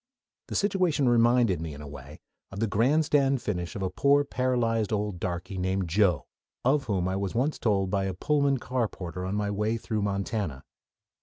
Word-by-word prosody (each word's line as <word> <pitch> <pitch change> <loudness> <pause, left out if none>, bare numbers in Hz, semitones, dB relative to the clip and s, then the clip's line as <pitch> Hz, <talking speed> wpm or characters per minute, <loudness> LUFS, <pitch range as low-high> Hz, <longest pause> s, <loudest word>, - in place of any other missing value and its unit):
The - - -5
situation 185 -9 +2
reminded 120 -6 +3
me 80 -3 -5
in 70 - -10
a - - -8
way 70 0 -11 0.3
of 95 - -8
the 115 - +2
grandstand 135 +4 +2
finish 90 -3 -3
of 100 - -3
a 95 - -1
poor 140 +8 +3
paralyzed 120 -5 0
old 105 -3 -2
darky 90 +2 -4
named 95 -1 -1
Joe, 90 -6 +2 0.4
of 140 +2 +3
whom 95 -6 0
I 95 - -1
was 100 0 -3
once 135 +6 0
told 95 -4 +1
by 100 -1 +1
a 95 -1 -3
Pullman 140 +5 +1
car 125 -1 -1
porter 90 -2 -7
on 95 - -2
my 105 -1 -1
way 105 +3 0
through 110 -1 -3
Montana. 100 - -2
105 Hz, 185 wpm, -27 LUFS, 95-125 Hz, 0.4 s, reminded